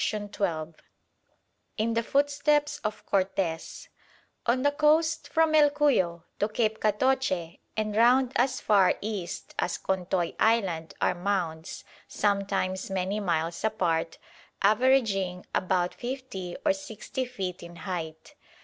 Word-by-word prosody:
CHAPTER 200 Hz, -6 st, -2 dB
VIII 165 Hz, -, -21 dB, 1.0 s
IN 225 Hz, +1 st, 0 dB
THE 230 Hz, -, +2 dB
FOOTSTEPS 285 Hz, +3 st, +1 dB
OF 215 Hz, -1 st, -4 dB
CORTES 185 Hz, -4 st, -1 dB, 0.6 s
On 255 Hz, +2 st, +2 dB
the 285 Hz, -, +4 dB
coast 315 Hz, +2 st, +2 dB
from 320 Hz, -1 st, +2 dB
El 300 Hz, -1 st, +6 dB
Cuyo 245 Hz, -, +1 dB, 0.2 s
to 205 Hz, -, +1 dB
Cape 220 Hz, 0 st, 0 dB
Catoche 210 Hz, -6 st, 0 dB, 0.2 s
and 215 Hz, -1 st, -1 dB
round 245 Hz, +3 st, +5 dB
as 255 Hz, +2 st, +2 dB
far 195 Hz, -3 st, +4 dB
east 205 Hz, -5 st, -5 dB
as 180 Hz, -, 0 dB
Contoy 185 Hz, -2 st, -1 dB
Island 190 Hz, -8 st, +1 dB
are -, -, +3 dB
mounds, 175 Hz, -3 st, -3 dB, 0.2 s
sometimes 195 Hz, -2 st, -1 dB
many 190 Hz, +2 st, -1 dB
miles 170 Hz, -3 st, -1 dB
apart, 165 Hz, -7 st, 0 dB, 0.5 s
averaging 205 Hz, -5 st, +2 dB
about 180 Hz, -1 st, +1 dB
50 240 Hz, -8 st, -6 dB
or 295 Hz, -, +5 dB
60 265 Hz, -2 st, -5 dB
feet 190 Hz, -8 st, -5 dB
in 170 Hz, 0 st, -10 dB
height. 160 Hz, -2 st, -6 dB
205 Hz, 120 wpm, -28 LUFS, 180-255 Hz, 1.0 s, El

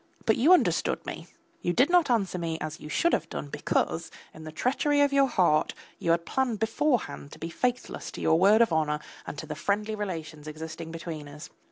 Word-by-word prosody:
But 220 Hz, -, +4 dB
you 275 Hz, +9 st, +4 dB
understood 365 Hz, -, +3 dB
me; -, -, -7 dB, 0.3 s
you 175 Hz, -, 0 dB
did 265 Hz, -, +3 dB
not 350 Hz, -5 st, +4 dB
answer 200 Hz, -6 st, +1 dB
me 165 Hz, -1 st, -2 dB
as 155 Hz, -1 st, -5 dB
you 150 Hz, -, -9 dB
should 340 Hz, -, +2 dB
have -, -, 0 dB
done 145 Hz, -, -5 dB
because, -, -, -1 dB, 0.2 s
in 155 Hz, -, -11 dB
the 155 Hz, -, -7 dB
treachery 275 Hz, -, +1 dB
of 285 Hz, -1 st, +3 dB
your 275 Hz, -1 st, +5 dB
heart, 180 Hz, -10 st, +2 dB, 0.2 s
you -, -, -2 dB
had 170 Hz, 0 st, +2 dB
planned 260 Hz, -4 st, 0 dB
beforehand 225 Hz, -, -1 dB
to -, -, -10 dB
be 165 Hz, +1 st, -6 dB
faithless 250 Hz, +7 st, -2 dB
to -, -, -7 dB
your 160 Hz, 0 st, +3 dB
word 205 Hz, +5 st, +6 dB
of 225 Hz, -, -1 dB
honour 150 Hz, -1 st, +1 dB, 0.3 s
and -, -, -6 dB
to 155 Hz, -, -5 dB
the 155 Hz, -, -5 dB
friendly 205 Hz, +7 st, -1 dB
relations 165 Hz, -7 st, -5 dB
existing 160 Hz, +1 st, -7 dB
between 165 Hz, -3 st, -6 dB
us. 145 Hz, +2 st, -10 dB
180 Hz, 210 wpm, -27 LUFS, 155-245 Hz, 0.3 s, word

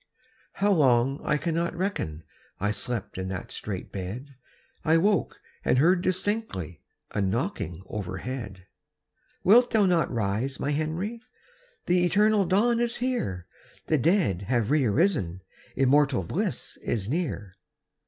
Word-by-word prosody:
How 205 Hz, +1 st, +2 dB
long 135 Hz, -4 st, +3 dB
I -, -, +1 dB
cannot 170 Hz, +3 st, -1 dB
reckon, 165 Hz, -, -3 dB, 0.4 s
I 105 Hz, +2 st, +1 dB
slept 110 Hz, -4 st, -3 dB
in 95 Hz, -, -3 dB
that 95 Hz, -1 st, -5 dB
strait 95 Hz, -3 st, -5 dB
bed; 110 Hz, +9 st, -6 dB, 0.5 s
I 160 Hz, +1 st, +4 dB
woke 195 Hz, 0 st, +1 dB, 0.2 s
and -, -, +2 dB
heard 175 Hz, +6 st, +4 dB
distinctly 185 Hz, -, -2 dB, 0.3 s
A 105 Hz, -, -1 dB
knocking 95 Hz, -2 st, -2 dB
overhead. 100 Hz, +1 st, -5 dB, 0.8 s
"Wilt 240 Hz, +6 st, +6 dB
thou 220 Hz, -3 st, +3 dB
not 175 Hz, -3 st, +2 dB
rise, 115 Hz, +4 st, -1 dB
my 145 Hz, -, -1 dB
Henry? 165 Hz, +10 st, -2 dB, 0.6 s
The 175 Hz, 0 st, +3 dB
eternal 205 Hz, +3 st, +3 dB
dawn 225 Hz, +7 st, +3 dB
is 235 Hz, -1 st, +1 dB
here; 240 Hz, -, -2 dB, 0.4 s
The 155 Hz, -, +2 dB
dead 160 Hz, -, +2 dB
have 120 Hz, -1 st, +1 dB
re 150 Hz, -3 st, +3 dB
arisen, 110 Hz, -, +1 dB, 0.3 s
Immortal 135 Hz, -3 st, +3 dB
bliss -, -, -3 dB
is 100 Hz, -4 st, -2 dB
near." 130 Hz, -, -2 dB
140 Hz, 130 wpm, -27 LUFS, -, 0.8 s, Wilt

